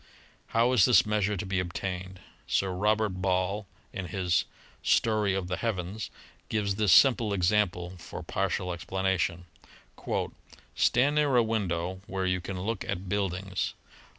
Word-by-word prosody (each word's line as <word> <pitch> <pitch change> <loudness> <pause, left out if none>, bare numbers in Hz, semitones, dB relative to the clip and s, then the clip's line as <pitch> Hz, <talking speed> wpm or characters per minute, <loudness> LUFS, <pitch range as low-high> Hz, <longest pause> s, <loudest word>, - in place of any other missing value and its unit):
How 115 +2 +2
is 115 -7 +6
this 125 - +6
measure 105 -1 0
to 95 - -4
be 95 -1 -1
obtained? 90 +1 -4 0.3
Sir 95 -1 +1
Robert 105 +3 +2
Ball 95 +2 0 0.3
in 95 -2 -4
his 90 -3 +1 0.4
"Story 105 -3 +2
of 95 -2 -2
the 90 0 -2
Heavens," 105 -1 -3 0.4
gives 105 -2 0
this 105 -3 +3
simple 115 +1 +6
example 90 -2 +1
for 85 - -8
partial 90 -1 -1
explanation: 90 0 -1 1.3
"Stand 130 +5 +3
near 145 -3 +3
a 120 - +6
window 95 -5 -2
where 95 0 -2
you 90 -1 0
can 90 0 -5
look 110 +2 -2
at 95 -1 -4
buildings 95 -1 -2
95 Hz, 140 wpm, -28 LUFS, 90-105 Hz, 1.3 s, is